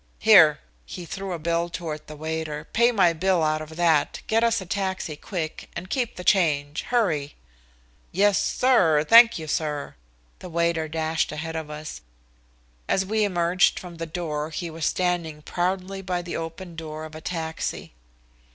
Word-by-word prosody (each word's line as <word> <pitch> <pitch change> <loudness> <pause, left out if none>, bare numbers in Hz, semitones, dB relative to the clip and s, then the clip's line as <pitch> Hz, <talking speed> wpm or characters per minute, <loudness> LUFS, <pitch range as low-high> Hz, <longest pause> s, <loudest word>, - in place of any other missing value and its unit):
"Here!" 170 -9 +7 0.3
He 175 - -8
threw 195 +3 -5
a 175 - -2
bill 170 +1 -1
toward 155 -3 -6
the 155 - -9
waiter. 155 -1 -4
"Pay 235 +2 +4
my 185 -7 +4
bill 180 0 +1
out 155 0 +1
of 155 0 -9
that, 165 -3 +2
get 225 +1 +2
us 230 0 +2
a 190 - -7
taxi 190 -4 -3
quick, 160 0 -5
and 185 - -7
keep 250 -4 -1
the 180 - -7
change. 150 -6 +2
Hurry." 165 -13 0 0.8
"Yes, 200 +2 +3
sir 180 -13 +3
thank 230 -1 +8
you, 160 - -6
sir." 150 -1 -2 0.5
The 180 - -9
waiter 170 -1 0
dashed 160 +1 -1
ahead 160 +2 -5
of 160 -2 -4
us. 150 +1 -7 0.9
As 190 - +1
we 215 +2 +1
emerged 180 -1 +2
from 175 -2 -8
the 165 0 -5
door 155 -2 -3
he 165 +1 -5
was 160 -1 -2
standing 170 -4 -1
proudly 185 +3 -2
by 180 -2 -2
the 175 - -5
open 165 +2 -6
door 155 -1 -6
of 155 - -11
a 155 - -9
taxi. 160 - -4
170 Hz, 170 wpm, -25 LUFS, 155-190 Hz, 0.9 s, thank